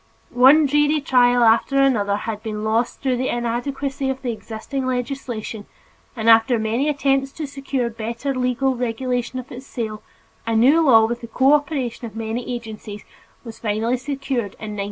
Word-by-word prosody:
One 270 +5 +6
dreary 295 +2 +2
trial 245 -3 +3
after 235 +4 +3
another 215 -7 +2
had 210 0 -4
been 215 -1 -5
lost 225 +4 -1
through 260 -2 +1
the 255 +1 -1
inadequacy 265 +3 -2
of 265 0 -4
the 245 - -1
existing 230 +4 -5
legislation 245 -4 -4 0.5
and 225 -2 -3
after 225 +2 +6
many 225 +6 0
attempts 275 -1 +1
to 315 - -5
secure 275 -3 -3
better 235 +4 -4
legal 255 +1 0
regulation 245 +1 -2
of 255 0 -7
its 255 +2 -9
sale, 220 -3 -5 0.5
a 230 - 0
new 270 +9 +5
law 230 -8 +6
with 240 +1 -3
the 235 - -7
cooperation 265 -1 +1
of 220 - -13
many 225 +2 -4
agencies 220 -3 -7 0.4
was 230 -2 -10
finally 225 +3 0
secured 265 -5 -3
in 215 -1 -6
1907. - - -7
245 Hz, 165 wpm, -21 LUFS, 225-270 Hz, 0.5 s, One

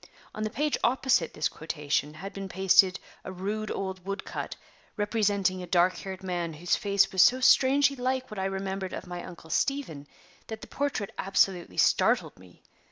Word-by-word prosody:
On 215 - -6
the 215 - -1
page 295 +5 -1
opposite 245 -9 +2
this 150 - +1
quotation 150 -1 -3
had 195 +5 -8
been 195 -1 -6
pasted 190 0 +4 0.2
a - - -6
rude 205 +3 -4
old 190 -2 -4
wood 195 +2 -5
cut, - - -5 0.4
representing 205 -3 +1
a 180 - -7
dark 175 +1 +3
haired 190 -1 -7
man, 175 -3 -3
whose 175 +3 0
face 200 -1 +2
was 190 -2 +3
so 250 +6 +6
strangely 275 +2 +5
like 255 -1 -2
what 210 - -6
I 190 - -1
remembered 195 0 -3
of - - -6
my 175 -1 -6
Uncle 165 -2 -11
Stephen 170 - -1 0.4
that 220 -1 -7
the - - -7
portrait 280 -8 -2
absolutely 190 -2 +1
startled - - +2
me. 90 -1 -18
195 Hz, 175 wpm, -28 LUFS, 180-215 Hz, 0.4 s, so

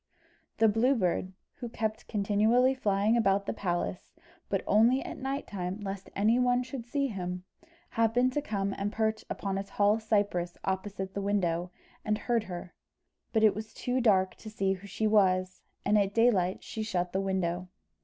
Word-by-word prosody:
The 225 - +5
Blue 230 +6 +3
Bird, 185 -3 0 0.3
who 240 - -6
kept 220 -1 -3
continually 220 +5 +3
flying 210 -3 +1
about 200 -3 +2
the - - -2
palace, 175 - -3 0.3
but - - 0
only 235 +6 +4
at - - -7
night 270 +2 -3
time, 185 0 -4
lest 195 -1 -5
any 220 +5 +3
one 250 0 +3
should 255 -2 -7
see 280 +3 0
him, 180 -3 -4 0.5
happened 240 +3 +2
to 295 - 0
come 200 -7 -2
and 200 +1 -1
perch 220 0 0
upon 195 -1 -2
a - - -2
tall 205 +2 +2
cypress 205 -5 0
opposite 190 0 -3
the 200 - -3
window, 180 -4 0 0.3
and 210 0 0
heard 230 -1 0
her; 175 -1 -7 0.6
but 220 -2 +2
it 215 - +6
was 215 +1 -7
too 255 +1 -1
dark 190 -5 +3
to 220 - -9
see 195 -2 0
who 195 +1 -9
she 200 +3 -2
was, 185 -3 +2 0.2
and 210 +1 +4
at 200 0 0
daylight 205 -6 +3
she 220 - -5
shut 180 -5 -2
the 190 - +1
window. 185 -2 -1
205 Hz, 175 wpm, -30 LUFS, 190-225 Hz, 0.6 s, it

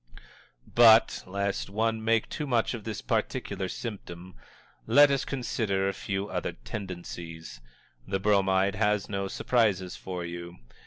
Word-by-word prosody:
But, 115 -1 +6
lest 100 +2 -2
one 110 +2 0
make 115 0 +2
too 150 - -4
much 120 -2 +1
of 115 -4 -7
this 110 -2 -5
particular 95 - -2
symptom, 95 -6 -7 0.5
let 145 0 +7
us 135 -1 +1
consider 110 -7 -1
a 100 - 0
few 95 0 -3
other - - -3
tendencies. 85 -3 -8 0.5
The 95 - -1
Bromide 95 -1 +3
has 105 -1 +1
no 100 -1 -2
surprises 100 -5 +1
for 90 -2 -5
you. 85 0 -7
100 Hz, 135 wpm, -28 LUFS, 95-110 Hz, 0.5 s, let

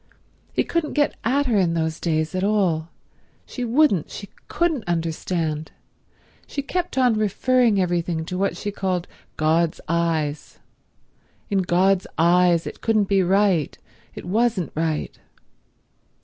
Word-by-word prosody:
He - - +1
couldn't 335 -3 -2
get 290 -1 +2
at 275 +5 +1
her 230 -6 +2
in 170 -3 +1
those 160 0 -1
days 155 -1 -1
at 185 0 -1
all; 185 -6 +1 0.6
she 250 - -6
wouldn't, 240 - +2
she 200 - -8 0.2
couldn't 325 -8 0
understand. 165 -2 -2 0.8
She 280 - -4
kept 355 +1 -3
on 250 -3 +4
referring 220 +1 +2
everything 175 -2 -1
to 180 - -5
what 195 +2 -1
she 205 - -4
called 185 -3 -2 0.3
God's 160 +1 +1
eyes—in 165 +4 -4
God's 185 +1 +2
eyes 170 0 +4
it - - -8
couldn't 215 -3 +1
be 195 -1 +3
right, 185 -4 +2 0.4
it - - -8
wasn't 215 -1 0
right. 160 -1 -2
185 Hz, 130 wpm, -23 LUFS, 165-215 Hz, 0.8 s, on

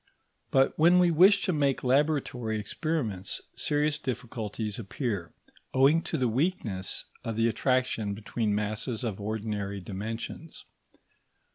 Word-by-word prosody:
But 135 0 +3
when 170 +3 +6
we 180 -1 +5
wish 190 +5 +6
to 185 - +1
make 140 -3 +1
laboratory 130 -4 +1
experiments 105 - -2 0.2
serious 150 0 +1
difficulties 115 -5 -4
appear, 105 - -3 0.4
owing 140 +5 +5
to - - -2
the 130 - +2
weakness 115 - -1 0.2
of 115 - -3
the 115 +1 +3
attraction 115 -3 0
between 110 0 -1
masses 110 +4 -2
of 105 -4 -3
ordinary 105 -2 -3
dimensions. 110 - -6
115 Hz, 120 wpm, -28 LUFS, 105-145 Hz, 0.4 s, when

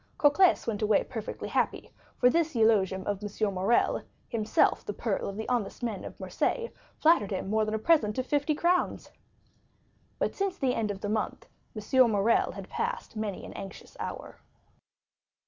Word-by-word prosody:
Cocles 310 +5 +4
went 220 -2 -2
away 215 -1 +3
perfectly 225 -4 -6
happy, - - -1 0.3
for 250 - +5
this 330 -2 +1
eulogium 200 -4 +3
of 205 -1 -2
M. 205 0 -1
Morrel, 190 +6 +2 0.3
himself 220 -3 +2
the 205 - -4
pearl 205 -2 -2
of 200 - -7
the 220 - -4
honest 240 -1 -2
men 225 -5 -3
of - - -9
Marseilles, 470 -1 -1 0.3
flattered 315 - +4
him 190 0 -3
more 220 0 +2
than 215 0 -2
a - - +1
present 220 -4 +2
of 255 - -1
fifty 290 +2 +1
crowns. 350 +3 0 1.1
But - - -1
since 390 -2 -2
the 260 -5 +1
end 220 -2 -1
of 195 -1 -5
the 205 - -3
month 215 0 -2 0.3
M. 240 +4 +3
Morrel 210 +2 +2
had - - -8
passed - - -4
many 215 -3 -4
an - - -9
anxious 195 - -9
hour. - - -6
220 Hz, 170 wpm, -29 LUFS, 205-265 Hz, 1.1 s, for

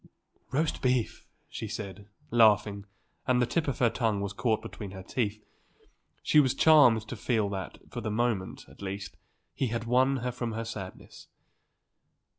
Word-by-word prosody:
"Roast 150 +4 -1
beef!" 125 -3 0 0.2
she - - -6
said, 100 0 -7 0.2
laughing, 105 -3 +4 0.4
and 125 -1 +3
the 125 - +3
tip 165 +6 -1
of 140 - -1
her 120 -3 +3
tongue 110 -5 0
was 100 0 -3
caught 110 +1 +1
between 105 - -7
her 95 0 -9
teeth. 105 -1 -2 0.8
He 150 - +5
was 130 -4 +3
charmed 125 -9 +6
to - - -5
feel 110 -1 0
that, 95 -5 -5
for 120 - -5
the 110 - -3
moment, 110 -3 -1
at - - -17
least, 100 0 -5 0.4
he 135 - -1
had 115 0 -2
won 130 +3 +3
her 125 - 0
from 120 -2 -4
her 115 +1 -3
sadness. 100 -5 -8
115 Hz, 165 wpm, -29 LUFS, 100-125 Hz, 0.8 s, charmed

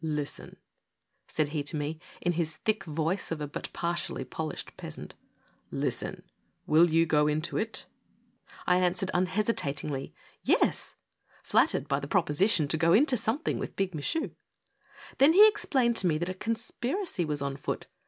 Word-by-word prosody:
" - - -21 0.2
Listen," - - -9 0.7
said 155 -2 0
he 150 0 -2
to 150 +2 -3
me, 150 +2 -3 0.2
in 175 - +1
his 165 -2 -1
thick 215 +3 -1
voice 165 +4 -1
of 165 - -3
a 150 - -2
but 145 - -6
partially 170 -5 -2
polished 155 +5 -5
peasant, - - -8 0.3
" - - -37
listen: - - -2 0.4
will 165 +3 +5
you 165 +1 +4
go 150 -2 +3
into 155 +2 -1
it? 220 0 -2 0.4
" - - -22
I 180 - +4
answered, 185 +1 +1
unhesitatingly; 180 -7 -1 0.3
"Yes!" - - +2 0.5
flattered - - +2
by 140 - +1
the 140 - -6
proposition 170 0 +2
to 160 - +2
go 165 +1 +4
into 270 +3 +5
something 230 +7 -1
with - - -5
Big 195 -2 -1
Michu. 235 - -1 0.9
Then 280 +4 +7
he 415 +4 +9
explained 250 - +2
to 185 - +2
me 155 -3 +2
that 175 +3 -2
a - - -2
conspiracy 230 - -2
was 150 -3 -2
on 140 -1 -2
foot. - - -4
175 Hz, 165 wpm, -29 LUFS, 155-215 Hz, 0.9 s, he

